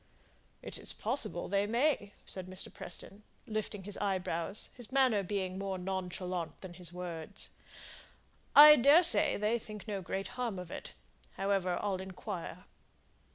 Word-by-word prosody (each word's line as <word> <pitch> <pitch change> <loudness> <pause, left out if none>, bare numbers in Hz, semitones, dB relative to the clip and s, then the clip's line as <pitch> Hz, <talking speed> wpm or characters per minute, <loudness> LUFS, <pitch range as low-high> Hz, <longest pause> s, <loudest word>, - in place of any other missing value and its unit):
"It - - -6
is - - 0
possible - - -1
they 200 +1 +1
may!" 235 -3 +1
said 185 -1 -6
Mr. 185 0 -7
Preston, 195 +1 -9 0.2
lifting 215 -2 -4
his 205 +1 -3
eyebrows, 185 -1 -1
his 245 -1 -10
manner 260 -6 +4
being 190 -1 -3
more 195 -1 -3
nonchalant 180 -2 -4
than 185 -2 -8
his 175 -1 -4
words. 175 +1 -5 1.0
"I 300 +1 +11
daresay 315 +8 +6
they 215 +3 +1
think 210 -3 -9
no 200 -2 -3
great 190 +2 -4
harm 245 -5 -3
of 180 -2 -7
it. - - -7 0.4
However, 195 -2 0
I'll 200 -2 0
inquire." 190 -1 -7
195 Hz, 140 wpm, -32 LUFS, 185-215 Hz, 1.0 s, I